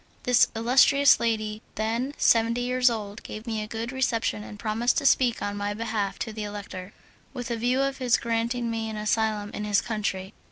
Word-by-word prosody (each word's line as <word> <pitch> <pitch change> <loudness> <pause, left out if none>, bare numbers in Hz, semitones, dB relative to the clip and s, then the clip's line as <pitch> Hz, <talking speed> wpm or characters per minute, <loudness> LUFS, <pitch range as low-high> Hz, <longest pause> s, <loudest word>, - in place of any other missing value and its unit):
This 250 -1 +5
illustrious 265 +5 +5
lady, 215 -2 -1
then 235 +6 -2
seventy 230 +1 +3
years 250 +1 +3
old, 210 -3 -5
gave 215 +1 -8
me 220 -2 -2
a 210 - -5
good 225 +2 -4
reception 240 -5 -1
and 210 - -10
promised 225 +3 0
to - - 0
speak 250 -3 +3
on 205 0 -2
my 205 0 -3
behalf 220 -3 -2
to 220 - -7
the 215 - -6
Elector, 205 -2 -7 0.4
with 245 -1 -5
a - - 0
view 245 +3 0
to 275 0 +1
his 255 -3 +1
granting 235 +1 -1
me 225 -1 -3
an 215 - -5
asylum 215 -1 0
in 210 - -4
his 210 -1 +2
country. 205 -4 -3
225 Hz, 195 wpm, -26 LUFS, 210-240 Hz, 0.4 s, This